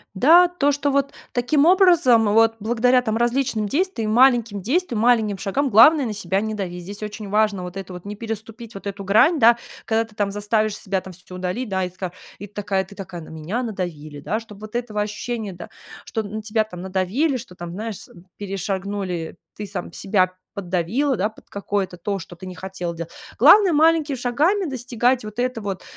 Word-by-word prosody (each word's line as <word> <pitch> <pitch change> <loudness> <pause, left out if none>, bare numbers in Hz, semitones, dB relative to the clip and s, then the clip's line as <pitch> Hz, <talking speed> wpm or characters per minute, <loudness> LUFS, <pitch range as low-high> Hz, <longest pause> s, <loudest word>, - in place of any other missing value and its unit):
Да, 330 - +7
то, 345 -5 +1
что 285 0 0
вот 280 0 +1 0.2
таким 275 +4 +2
образом, 330 - +5
вот 225 +1 +4
благодаря 245 +3 +3
там 220 -2 -1
различным 240 -2 0
действиям, 275 - -1
маленьким 235 -4 +4
действиям, 255 - 0
маленьким 220 -4 +3
шагам, 255 +9 -1
главное, 260 +6 +7
на 220 - -3
себя 195 -2 -1
не 215 +1 -3
дави. 185 -4 -4
Здесь 200 +4 -8
очень 210 0 -6
важно 210 -2 +1
вот 180 +1 -8
эту 190 -1 -7
вот 180 - -9
не 205 +1 -6
переступить 225 +1 -7
вот 195 - -10
эту 200 0 -5
грань, 250 - +4
да, 235 +1 +6 0.3
когда 225 0 +1
ты 225 -1 -18
там 205 -1 -1
заставишь 210 +1 0
себя 190 -1 -2
там 190 - -11
всё 180 +1 -12
удалить, 185 +7 -3
да, 190 -2 -1
и - - -3
ты 180 - -26
такая 185 -2 -4 0.3
и 205 - -7
ты 205 - -24
такая 195 -2 -1
ты 195 +2 -14
такая: 185 -3 -8
на - - -12
меня 160 +10 -4
надавили, 160 -9 -5
да. 205 +9 -2
Чтоб 210 -3 -12
вот 215 +2 -7
этого 230 -3 -3
ощущения, 215 0 -4
да, 175 -1 -10 0.4
что 220 - -3
на 215 +1 -6
тебя 220 +1 +1
там 180 -5 -9
надавили, 190 - 0
что 230 -7 -9
там, 175 -1 -7
знаешь, 215 +2 -6 0.3
перешагнули, 195 -3 -4 0.2
ты 210 - -5
сам 195 -2 -6
себя 185 -2 +1 0.2
поддавила, 200 - 0
да, 205 +1 0
под 220 - -20
какое-то 200 -2 -3
то, 195 +3 -3
что 175 +1 -11
ты 185 - -10
не 185 - -7
хотела 180 -1 -5
дела 170 0 -6 0.3
главное, 405 -4 +7
маленькими 315 -1 +3
шагами 295 - +1
достигать 245 -2 0
вот 215 +2 -5
это 250 -2 -1
вот 195 -3 -4
215 Hz, 200 wpm, -22 LUFS, 190-245 Hz, 0.4 s, Да